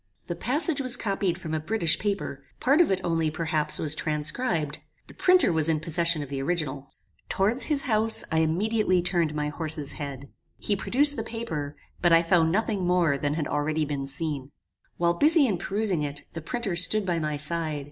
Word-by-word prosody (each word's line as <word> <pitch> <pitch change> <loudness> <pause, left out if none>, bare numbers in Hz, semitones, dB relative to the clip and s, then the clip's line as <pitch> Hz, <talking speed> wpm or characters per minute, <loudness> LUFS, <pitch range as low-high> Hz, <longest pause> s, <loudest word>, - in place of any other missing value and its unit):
This 175 - -5
passage 290 +4 0
was 255 -2 +1
copied 195 -5 -1
from 165 -4 -7
a 155 - 0
British 165 -2 +1
paper; 195 -9 -3 0.2
part 280 +7 +3
of 340 - +3
it 190 - +1
only, 165 -2 0
perhaps, 155 -1 -1
was 150 -1 +1
transcribed. 155 - -2 0.3
The - - -13
printer 365 - +3
was 160 0 +1
in 155 -1 +1
possession 165 0 0
of 140 - -10
the 135 -1 -4
original. 145 -3 -3 0.4
"Towards 210 +7 +1
his 295 -3 +2
house 220 -1 +4
I 160 - +2
immediately 185 +3 +1
turned 170 -4 -1
my 150 0 -2
horse's 155 -1 +2
head. 140 -2 -7 0.3
He 205 - -1
produced 285 +9 +3
the - - -2
paper, 155 -11 -5 0.3
but 175 - +3
I 165 0 +5
found 165 -1 +2
nothing 210 0 -1
more 175 -5 +2
than 145 +1 -2
had 155 -2 -2
already 155 +1 -1
been 140 -2 -4
seen. 140 -1 -4 0.5
While 170 0 +2
busy 300 - +4
in 200 -8 -1
perusing 200 -4 -1
it, 145 -1 -5
the 165 - -6
printer 225 0 -3
stood 190 +4 +4
by 175 -2 -1
my 150 -2 -2
side. 155 0 -2
170 Hz, 190 wpm, -26 LUFS, 150-210 Hz, 0.5 s, I